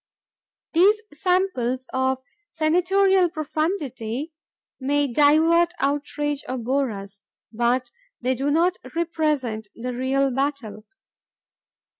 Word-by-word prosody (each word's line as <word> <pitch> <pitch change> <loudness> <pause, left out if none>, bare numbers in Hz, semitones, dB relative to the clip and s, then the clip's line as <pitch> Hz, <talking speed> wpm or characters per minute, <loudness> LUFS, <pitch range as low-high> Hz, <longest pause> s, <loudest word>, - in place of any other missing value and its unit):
These 395 +6 +5
samples 295 -8 0
of 260 0 0 0.3
senatorial 360 +3 +3
profundity 305 - -3 0.5
may 285 +2 +1
divert, 320 +6 +4
outrage, 290 0 -1
or 260 - -2
bore 260 +3 0
us, 200 -1 -9 0.3
but 240 +3 0 0.3
they 255 +1 0
do 270 +3 -1
not 345 +5 +2 0.2
represent 300 -10 -1
the 250 +2 -4
real 265 +2 +1
battle. 255 -6 -3
285 Hz, 95 wpm, -23 LUFS, 255-330 Hz, 0.5 s, These